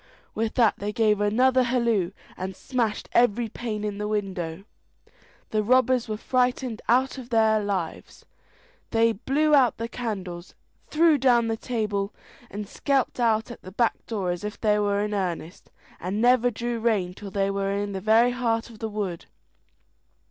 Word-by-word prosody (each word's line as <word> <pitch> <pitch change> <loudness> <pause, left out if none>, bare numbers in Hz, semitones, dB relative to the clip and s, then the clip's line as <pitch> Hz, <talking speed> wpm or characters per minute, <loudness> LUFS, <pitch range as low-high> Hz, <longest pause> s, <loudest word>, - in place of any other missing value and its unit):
With 220 0 -2
that 235 -4 +3
they 205 +1 -2
gave 210 -1 +2
another 255 +5 +3
halloo, 235 -7 +1 0.3
and 190 +1 -5
smashed 230 -1 -2
every 235 -1 +3
pane 215 -2 -4
in 205 -1 -3
the 210 - -2
window. 190 -5 -3 0.9
The 215 - +2
robbers 255 +1 +3
were 215 - -2
frightened 250 -1 0
out 260 +3 +2
of 245 -2 -10
their 220 -2 +3
lives. 190 -5 -4 0.6
They 230 0 +3
blew 290 +8 +1
out 260 -5 +5
the 230 - -3
candles, 195 -8 -6 0.3
threw 315 -1 +4
down 240 -3 +3
the 225 - 0
table, 210 -4 -2 0.3
and 205 0 -6
skelped 270 +2 -1
out 225 -1 +1
at 235 - -10
the 185 - -10
back 235 +2 0
door 195 -6 -2
as 175 +2 -5
if 210 +1 -5
they 210 -1 +2
were 205 -1 +1
in 210 0 -2
earnest, 180 -4 -4 0.3
and 185 +4 -3
never 245 +1 +4
drew 235 +1 -3
rein 210 -6 0
till 200 +2 -9
they 195 0 0
were 195 0 -1
in 200 0 -2
the 190 -1 -4
very 225 +4 +4
heart 235 -2 -1
of 220 - -14
the 225 - -3
wood. 200 -5 -4
220 Hz, 170 wpm, -25 LUFS, 200-240 Hz, 0.9 s, out